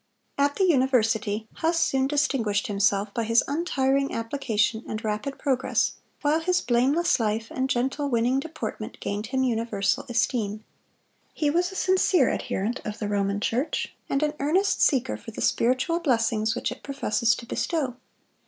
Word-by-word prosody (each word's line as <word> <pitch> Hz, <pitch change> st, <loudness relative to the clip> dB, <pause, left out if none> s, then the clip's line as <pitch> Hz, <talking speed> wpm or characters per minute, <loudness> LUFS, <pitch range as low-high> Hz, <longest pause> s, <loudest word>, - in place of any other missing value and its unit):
At 285 Hz, 0 st, +1 dB
the 390 Hz, -, +1 dB
university, 225 Hz, -, +2 dB
Huss 330 Hz, +1 st, +1 dB
soon 265 Hz, -4 st, +2 dB
distinguished 270 Hz, -8 st, 0 dB
himself 200 Hz, -1 st, +1 dB
by 230 Hz, -, -1 dB
his 230 Hz, +1 st, +3 dB
untiring 275 Hz, -3 st, 0 dB
application 230 Hz, -2 st, -1 dB
and 215 Hz, +2 st, -4 dB
rapid 215 Hz, +6 st, -3 dB
progress, 265 Hz, -2 st, +1 dB, 0.3 s
while 300 Hz, +2 st, +3 dB
his 360 Hz, +2 st, +1 dB
blameless 260 Hz, +8 st, +2 dB
life 220 Hz, 0 st, -1 dB
and 260 Hz, +1 st, -1 dB
gentle, 265 Hz, +4 st, 0 dB
winning 245 Hz, +2 st, +2 dB
deportment 275 Hz, -8 st, -6 dB
gained 205 Hz, +2 st, -3 dB
him 260 Hz, +2 st, 0 dB
universal 225 Hz, -5 st, 0 dB
esteem. 230 Hz, -3 st, -1 dB, 0.7 s
He 295 Hz, -2 st, +1 dB
was 355 Hz, +3 st, +1 dB
a -, -, -10 dB
sincere 370 Hz, -7 st, +3 dB
adherent 220 Hz, +6 st, -2 dB
of 210 Hz, 0 st, -5 dB
the 210 Hz, -, -3 dB
Roman 200 Hz, 0 st, 0 dB
Church, 245 Hz, +7 st, -1 dB, 0.2 s
and 275 Hz, +2 st, +1 dB
an 300 Hz, 0 st, 0 dB
earnest 355 Hz, +8 st, +1 dB
seeker 265 Hz, -3 st, +2 dB
for -, -, -11 dB
the 220 Hz, -, -8 dB
spiritual 260 Hz, +8 st, +1 dB
blessings 230 Hz, -7 st, +1 dB
which -, -, -2 dB
it -, -, -8 dB
professes 240 Hz, -4 st, +1 dB
to 235 Hz, -, -9 dB
bestow. 275 Hz, -1 st, -2 dB
250 Hz, 155 wpm, -26 LUFS, 220-285 Hz, 0.7 s, his